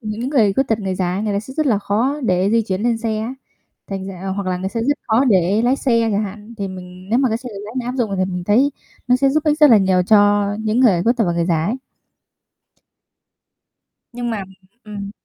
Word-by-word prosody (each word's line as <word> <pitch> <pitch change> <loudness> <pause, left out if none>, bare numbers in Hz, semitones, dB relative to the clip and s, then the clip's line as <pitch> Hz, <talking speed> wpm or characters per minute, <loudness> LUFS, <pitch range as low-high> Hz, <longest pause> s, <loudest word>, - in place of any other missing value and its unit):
những 220 +2 -4
người 225 -9 +3
khuyết 265 +6 0
tật, 220 - +1
người 190 -2 -2
già 180 -1 -1
ấy, 195 - -2
người 215 -1 -1
ta 200 - 0
sẽ 260 +5 -11
rất 310 0 0
là 225 -7 +2
khó 235 +9 -1
để 185 -1 +1
di 230 +1 +3
chuyển 195 -1 -3
lên 235 -1 +1
xe 225 -2 -2
á, 225 +4 -4 0.5
thành 195 -1 -5
r - - -5 0.3
hoặc 200 -1 -3
là 185 -1 -1
người 185 +1 -3
sẽ 230 +4 -4
rất 290 0 +1
khó 230 +4 +3
để 200 -2 +2
lái 250 +3 +2
xe 230 -5 +1
chẳng 205 - +1
hạn. 210 +3 -9
Thì 200 -1 -3
mình 185 0 -10
nếu 235 - +3
mà 265 -2 +2
cái 225 - -1
xe 250 0 -8
tự - - -6
lái 215 +3 -9
này 240 - -4
áp 250 - -3
dụng 235 -5 -1
thì 185 - +1
mình 180 -1 -4
thấy 245 +8 +3 0.4
nó 250 - +5
sẽ 275 +1 +2
giúp 310 +3 0
ích 300 0 +1
rất 300 -3 +7
là 230 - +8
nhiều 190 -1 +2
cho 205 +1 +4
những 220 +2 0
người 200 -9 +4
khuyết 235 +5 +2
tật 230 - +2
và 175 - +1
người 170 0 -1
già 165 -3 +1
ấy. 235 +8 -2 2.3
Nhưng 240 0 -4
mà 215 -3 -3 0.4
ừm. 205 -2 -7
215 Hz, 255 wpm, -19 LUFS, 195-245 Hz, 2.3 s, là